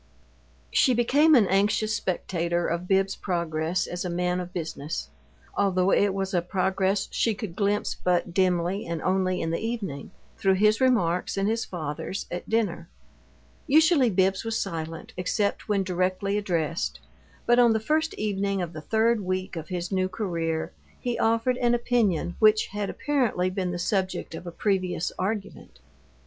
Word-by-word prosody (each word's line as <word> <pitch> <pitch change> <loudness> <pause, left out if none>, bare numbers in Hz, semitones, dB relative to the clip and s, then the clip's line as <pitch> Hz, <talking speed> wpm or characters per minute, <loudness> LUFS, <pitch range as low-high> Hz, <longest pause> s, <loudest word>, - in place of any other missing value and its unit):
She 255 -3 +4
became 290 +7 +4
an 230 -6 +6
anxious 205 +3 +2
spectator 175 -2 -1
of 170 +2 -2
Bibbs's 195 0 +2
progress 170 0 -1
as 175 0 -4
a 180 - -3
man 180 +1 0
of 180 0 -6
business, 160 - -4 0.5
although 190 -1 +2
it 200 -1 +3
was 195 0 -2
a 175 - +2
progress 190 +2 0
she 225 -2 +1
could 200 -5 -6
glimpse 205 +1 0
but 175 -1 +1
dimly 185 +1 +1
and 170 -1 -3
only 185 -1 +1
in 165 - -1
the 165 - -1
evening, 210 -11 -4 0.3
through 190 -1 +3
his 215 +4 +3
remarks 195 -10 +2
and 195 0 +1
his 225 +1 0
father's 165 +3 -5
at 175 - -5
dinner. 205 -7 -1 0.8
Usually 310 -3 +5
Bibbs 190 -1 +1
was 225 -1 -1
silent, 165 -3 -5
except 200 +4 -1
when 200 -2 +2
directly 185 +2 -1
addressed, 170 -5 -1 0.5
but 240 +1 +4
on 240 -1 +6
the 220 - +1
first 310 +7 0
evening 200 -2 -1
of 175 -2 -3
the 155 - -7
third 225 +5 +2
week 185 0 -3
of 160 -1 -6
his 175 0 -4
new 185 -1 +1
career 170 -5 -2 0.3
he 245 -1 -2
offered 230 +3 +2
an 240 -1 +2
opinion 215 -8 +1
which 215 0 +5
had 205 0 -3
apparently 240 -11 0
been 185 -1 -2
the 175 - -3
subject 190 0 -1
of 175 - -8
previous 185 -4 0
argument. 200 +2 -4
190 Hz, 160 wpm, -26 LUFS, 175-215 Hz, 0.8 s, an